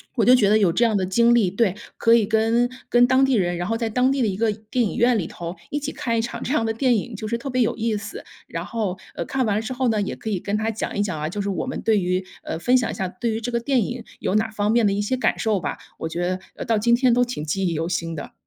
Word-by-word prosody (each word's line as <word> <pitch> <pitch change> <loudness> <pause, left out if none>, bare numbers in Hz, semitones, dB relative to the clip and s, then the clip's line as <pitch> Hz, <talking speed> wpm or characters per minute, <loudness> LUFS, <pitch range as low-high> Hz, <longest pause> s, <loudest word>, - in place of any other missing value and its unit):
我 230 - +2
就 250 +1 +7
觉 215 -5 +3
得 210 - +4
有 185 -5 +3
这 235 +7 +2
样 220 -2 +2
的 190 - +1
经 235 +5 +4
历 215 -6 +4
对， 195 -1 +1 0.2
可 230 - +4
以 230 -2 +5
跟 225 +2 +2 0.2
跟 245 0 +5
当 260 +1 +4
地 270 - +1
人， 175 -5 +1
然 175 +1 -3
后 225 - 0
在 225 -1 -1
当 250 +4 +2
地 275 -1 0
的 225 - +2
一 190 -1 -2
个 225 -1 +2
电 220 +3 -2
影 - - -3
院 240 -1 +3
里 180 - -1
头 170 +2 -6 0.2
一 295 - -1
起 295 +1 -4
看 230 -2 -2
一 - - +2
场 235 - -5
这 265 - -2
样 230 - +2
的 225 - 0
电 245 +1 +2
影， 220 +2 -3
就 215 +1 -5
是 235 - -1
特 270 +4 -5
别 250 -1 +2
有 - - 0
意 225 -1 -1
思， 205 0 -7 0.2
然 165 +1 -5
后 210 -3 -2 0.2
呃， - - -3
看 265 -1 -1
完 205 - +1
了 215 - 0
之 255 - -4
后 255 0 0
呢， 215 -2 +1
也 200 - -2
可 220 - -6
以 200 - 0
跟 205 +3 -2
她 215 +1 0
讲 220 -1 -4
一 - - +3
讲 185 -7 -2
啊， 150 - -2
就 205 +3 -3
是 200 - -2
我 195 - -2
们 260 - -4
对 220 -2 +3
于 180 +1 0 0.2
呃， 160 - -4
分 250 +7 +4
享 240 - 0
一 - - -5
下 190 - -2
对 225 +6 -3
于 220 - -3
这 245 +2 -3
个 235 - 0
电 250 -2 +1
影 245 -1 -5 0.2
有 195 - -1
哪 220 +1 +1
方 210 0 0
面 235 -2 +3
的 200 - +3
一 205 - 0
些 255 +5 -1
感 - - 0
受 215 -4 +1
吧， - - -4 0.2
我 160 - -4
觉 175 +2 -2 0.2
得 - - -5
到 225 -2 +2
今 235 +3 +4
天 250 0 +3
都 245 +1 +3
挺 240 -11 -5
记 185 +5 -1
忆 170 - -1
犹 165 +2 -2
新 165 -1 -2
的。 - - -8
220 Hz, 345 characters per minute, -23 LUFS, 195-240 Hz, 0.2 s, 就